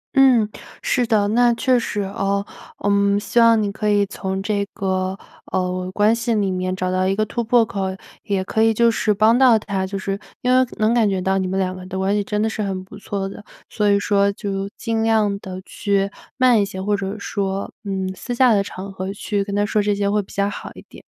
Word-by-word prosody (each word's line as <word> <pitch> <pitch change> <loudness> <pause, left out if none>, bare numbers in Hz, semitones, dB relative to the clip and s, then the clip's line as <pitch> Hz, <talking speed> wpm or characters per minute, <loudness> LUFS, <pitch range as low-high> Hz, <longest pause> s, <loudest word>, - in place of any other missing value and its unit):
嗯， 255 -5 +5 0.4
是 245 -2 +1
的， 215 -3 +2
那 240 +2 +4
确 255 0 +2
实 210 -3 -3
哦。 200 0 -1 0.4
嗯， 200 0 +3
希 205 +3 0
望 230 -1 +6
你 200 - -1
可 210 +1 -2
以 205 -1 +3
从 190 -1 -4
这 205 -1 0
个， 190 0 -1 0.3
呃， 185 0 -1
关 210 +3 +3
系 230 0 -1
里 200 -3 +1
面 185 0 -2
找 185 0 -2
到 185 0 +1
一 195 - +1
个 215 +1 +1
突 235 +3 -3
破 230 0 +4
口， 195 -3 -3 0.4
也 195 -2 0
可 220 +3 -1
以 225 - +5
就 235 +1 +4
是 220 -1 0
帮 215 +3 +4
到 255 -4 +6
他 195 -3 -3
就 195 - -4
是 195 +1 -3 0.2
因 250 0 +3
为 255 - +5
能 215 +2 +2
感 230 -3 +3
觉 190 -1 0
到 190 +1 +1
你 190 - -1
们 190 +1 -1
两 185 -1 -1
个 185 - -9
的 190 - -5
关 190 +1 +1
系 205 0 +1
真 210 +1 -2
的 215 - +2
是 220 -1 -3
很 190 -2 -3
不 185 - -13
错 200 -1 -3
的， 195 +2 -9 0.3
所 210 -2 +1
以 200 0 +4
说 200 0 +2
就 195 -1 -4
尽 225 -1 -1
量 215 -3 +2
地 185 -2 -7
去 200 -1 -1 0.3
慢 250 -4 +5
一 - - +3
些， 190 -1 -6
或 205 +2 0
者 200 +1 -4
说， 195 -1 -3
嗯， 190 -2 -2
私 245 +5 -5
下 250 -1 +5
的 200 - +3
场 195 0 -7
合 190 +1 -4
去 205 0 -2
跟 200 0 -4
他 205 0 +2
说 210 0 +1
这 205 0 +1
些 200 0 0
会 210 - +2
比 195 - -15
较 200 0 0
好 205 - -6
一 - - -12
点。 - - -14
200 Hz, 255 characters per minute, -21 LUFS, 195-220 Hz, 0.4 s, 望